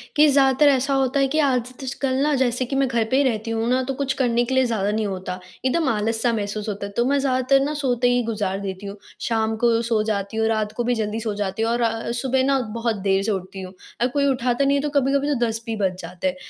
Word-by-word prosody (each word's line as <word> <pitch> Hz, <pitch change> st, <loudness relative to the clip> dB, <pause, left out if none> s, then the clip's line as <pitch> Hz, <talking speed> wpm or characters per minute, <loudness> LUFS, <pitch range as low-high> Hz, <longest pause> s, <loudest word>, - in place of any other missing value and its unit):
कि 300 Hz, +1 st, +6 dB
ज़्यादातर 275 Hz, +1 st, +4 dB
ऐसा 275 Hz, 0 st, +1 dB
होता 270 Hz, +1 st, +1 dB
है 275 Hz, -, +3 dB
कि 310 Hz, +4 st, 0 dB
आज 255 Hz, -4 st, +1 dB
तश 265 Hz, 0 st, -4 dB
कल 260 Hz, -2 st, +1 dB
ना 300 Hz, 0 st, +2 dB
जैसे 255 Hz, -1 st, +1 dB
कि 270 Hz, -, -4 dB
मैं 270 Hz, -1 st, +2 dB
घर 235 Hz, -2 st, +1 dB
पे 265 Hz, -, +3 dB
ही 285 Hz, -, +4 dB
रहती 230 Hz, -3 st, -1 dB
हूँ 225 Hz, +1 st, -1 dB
ना, 255 Hz, +1 st, +2 dB
तो 270 Hz, +1 st, -3 dB
कुछ 270 Hz, 0 st, -1 dB
करने 240 Hz, -3 st, +1 dB
के 260 Hz, +2 st, -2 dB
लिए 260 Hz, -1 st, +4 dB
ज़्यादा 210 Hz, -4 st, 0 dB
नहीं 215 Hz, 0 st, -1 dB
होता, 185 Hz, -1 st, -5 dB, 0.3 s
एकदम 315 Hz, +3 st, +1 dB
आलस-सा 225 Hz, +2 st, 0 dB
महसूस 210 Hz, 0 st, -3 dB
होता 200 Hz, 0 st, -4 dB
है 200 Hz, -, -7 dB
तो 240 Hz, -, +3 dB
मैं 280 Hz, +1 st, +2 dB
ज़्यादातर 265 Hz, 0 st, +2 dB
ना 300 Hz, -, -2 dB
सोते 250 Hz, -4 st, +1 dB
ही 245 Hz, 0 st, +2 dB
गुज़ार 205 Hz, -4 st, -2 dB
देती 195 Hz, 0 st, -6 dB
हूँ। 200 Hz, -, -7 dB, 0.2 s
शाम 220 Hz, -1 st, 0 dB
को 230 Hz, -1 st, +4 dB
सो 230 Hz, -2 st, +1 dB
जाती 210 Hz, 0 st, -3 dB
हूँ, 220 Hz, -, +2 dB
रात 215 Hz, -1 st, 0 dB
को 240 Hz, +2 st, -3 dB
भी 245 Hz, 0 st, +1 dB
जल्दी 215 Hz, 0 st, -2 dB
सो 220 Hz, -2 st, -3 dB
जाती 200 Hz, +1 st, -3 dB
हूँ, 225 Hz, +1 st, +1 dB
और 230 Hz, -1 st, -1 dB
सुबह 260 Hz, +1 st, 0 dB
ना 275 Hz, -1 st, +2 dB
बहुत 230 Hz, -1 st, -1 dB
देर 195 Hz, 0 st, +2 dB
से 215 Hz, -, 0 dB
उठती 190 Hz, 0 st, -5 dB
हूँ। 185 Hz, 0 st, -8 dB, 0.3 s
अ, 245 Hz, -, +4 dB
कोई 280 Hz, +2 st, 0 dB
उठाता 255 Hz, 0 st, +1 dB
नहीं 280 Hz, +1 st, +3 dB
है, -, -, 0 dB
तो 295 Hz, -, -2 dB
कभी-कभी 275 Hz, +2 st, +1 dB
तो -, -, -1 dB
10 225 Hz, 0 st, -3 dB
भी 225 Hz, -, -3 dB
बज 190 Hz, -3 st, 0 dB
जाते 180 Hz, +2 st, -4 dB
हैं। 185 Hz, -, -1 dB
235 Hz, 270 wpm, -22 LUFS, 215-265 Hz, 0.3 s, कि